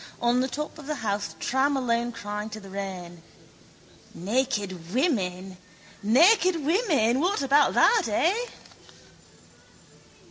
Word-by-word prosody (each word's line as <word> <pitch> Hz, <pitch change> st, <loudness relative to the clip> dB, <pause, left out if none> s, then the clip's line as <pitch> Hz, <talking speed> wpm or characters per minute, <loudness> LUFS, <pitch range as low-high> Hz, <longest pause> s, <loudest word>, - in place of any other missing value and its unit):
On 240 Hz, +1 st, +2 dB
the 260 Hz, -, +1 dB
top 300 Hz, +4 st, -6 dB
of 285 Hz, -, -11 dB
the 305 Hz, -, -2 dB
Howth 200 Hz, -5 st, -3 dB
tram 265 Hz, -, 0 dB
alone 240 Hz, -2 st, -1 dB
crying 210 Hz, -2 st, -6 dB
to 215 Hz, 0 st, -8 dB
the 195 Hz, -2 st, -13 dB
rain: 185 Hz, -3 st, -7 dB, 0.9 s
Naked 200 Hz, -5 st, -2 dB
women! 190 Hz, -, -1 dB, 0.4 s
Naked 335 Hz, -, +4 dB
women! 305 Hz, -, +2 dB
What 360 Hz, 0 st, 0 dB
about 280 Hz, +2 st, +3 dB
that, 450 Hz, -5 st, +4 dB
eh? 375 Hz, -, 0 dB
240 Hz, 115 wpm, -26 LUFS, 200-295 Hz, 0.9 s, Naked